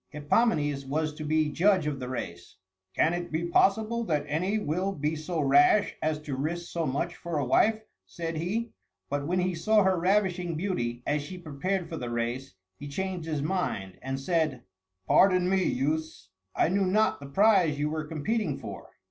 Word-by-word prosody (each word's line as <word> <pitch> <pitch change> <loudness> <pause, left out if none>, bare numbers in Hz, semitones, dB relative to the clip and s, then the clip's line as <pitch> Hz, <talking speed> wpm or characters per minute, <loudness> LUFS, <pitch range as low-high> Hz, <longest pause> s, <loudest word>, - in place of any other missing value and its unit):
Hippomenes 145 -2 +1
was 150 +3 -1
to 155 - -7
be 155 0 +1
judge 185 +1 +3
of 145 -2 -2
the 125 -1 -5
race. 90 -9 -6 0.4
"Can 165 - +3
it 175 0 -4
be 160 +2 -1
possible 220 +6 +2
that 150 -6 0
any 180 +8 0
will 190 +1 -1
be 150 -1 -1
so 160 +2 -3
rash 145 +9 +4
as 155 0 0
to 145 -3 -4
risk 170 +5 -3
so 165 -2 -1
much 170 +6 -2
for 170 -2 -4
a 145 - 0
wife?" 220 - +3 0.2
said 165 -1 -5
he. 215 +8 -2 0.4
But 145 0 -1
when 180 +2 0
he 180 0 0
saw 210 +5 +3
her 190 -2 +2
ravishing 180 -2 +1
beauty 125 -10 -2
as 150 0 0
she 180 +6 -8
prepared 175 +3 -3
for 165 - -6
the 120 -4 -4
race, 120 +1 -3 0.2
he 145 - -7
changed 180 +3 -4
his 150 -3 -2
mind, 150 - -2
and 135 0 -3
said, 155 -4 0 0.4
"Pardon 185 - +4
me, 190 0 +2
youths, 150 -6 -2 0.3
I - - +3
knew 195 +1 +1
not 215 +4 +2
the 140 - -9
prize 185 -1 +4
you 150 +1 -1
were 155 0 -2
competing 160 +2 -2
for." - - -8
160 Hz, 185 wpm, -28 LUFS, 145-185 Hz, 0.4 s, rash